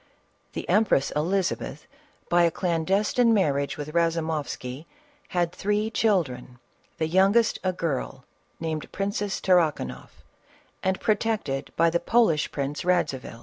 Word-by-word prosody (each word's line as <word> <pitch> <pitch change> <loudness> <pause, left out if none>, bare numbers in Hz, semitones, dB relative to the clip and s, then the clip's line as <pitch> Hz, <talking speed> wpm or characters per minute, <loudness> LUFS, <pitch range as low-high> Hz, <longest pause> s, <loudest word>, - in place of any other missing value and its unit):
The - - -5
empress 210 -10 +3
Elizabeth, 180 +5 -1 0.4
by 175 0 +3
a 170 - +5
clandestine 195 +8 +1
marriage 140 -6 +1
with 150 +1 -6
Eazumoifsky, 160 -5 -1 0.4
had 175 -2 0
three 210 +4 -1
children; 145 - 0 0.4
the 160 - 0
youngest 195 +7 +3
a 185 - +1
girl 135 -6 -3 0.3
named 160 -2 -4
princess 200 0 -2
Tarrakanoff 150 - 0 0.6
and 190 0 0
protected 210 -11 -1
by 165 0 +3
the 170 - +1
Polish 175 -6 +2
Prince 140 +1 -3
Eadzivil. 135 -10 -1
170 Hz, 115 wpm, -26 LUFS, 150-195 Hz, 0.6 s, a